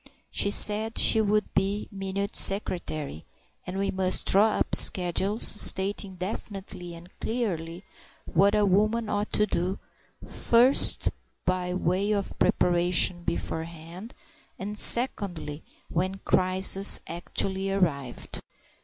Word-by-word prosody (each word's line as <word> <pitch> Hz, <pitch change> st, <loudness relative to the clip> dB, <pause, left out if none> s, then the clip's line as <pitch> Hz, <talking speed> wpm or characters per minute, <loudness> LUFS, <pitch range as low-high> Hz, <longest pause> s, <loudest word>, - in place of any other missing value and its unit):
She 200 Hz, -, 0 dB
said 215 Hz, +2 st, +4 dB
she 220 Hz, -, +4 dB
would 210 Hz, 0 st, -2 dB
be 200 Hz, +2 st, -2 dB
Minute 195 Hz, +1 st, -5 dB
Secretary, 155 Hz, -, +2 dB, 0.4 s
and 180 Hz, +1 st, -6 dB
we 195 Hz, 0 st, -2 dB
must 185 Hz, -1 st, +1 dB
draw 210 Hz, +2 st, +2 dB
up -, -, -3 dB
schedules 190 Hz, +4 st, +3 dB
stating 195 Hz, -1 st, +2 dB
definitely 185 Hz, -2 st, -8 dB
and 170 Hz, +1 st, -14 dB
clearly 180 Hz, -7 st, -5 dB, 0.4 s
what 200 Hz, +5 st, +1 dB
a 210 Hz, -1 st, +1 dB
woman 215 Hz, +3 st, -1 dB
ought 205 Hz, 0 st, -4 dB
to 210 Hz, -, +1 dB
do, 185 Hz, -1 st, -4 dB, 0.5 s
first 245 Hz, +4 st, +2 dB, 0.3 s
by 180 Hz, 0 st, -3 dB
way 185 Hz, +3 st, -2 dB
of 200 Hz, -2 st, -4 dB
preparation 175 Hz, 0 st, +1 dB
beforehand, 170 Hz, +4 st, -7 dB, 0.4 s
and 205 Hz, +2 st, -7 dB
secondly 195 Hz, -, +2 dB, 0.3 s
when 185 Hz, +3 st, -3 dB
the -, -, -11 dB
crisis 190 Hz, +1 st, +3 dB
actually 190 Hz, +3 st, -4 dB
arrived. 145 Hz, -10 st, -4 dB
190 Hz, 115 wpm, -25 LUFS, 175-205 Hz, 0.5 s, said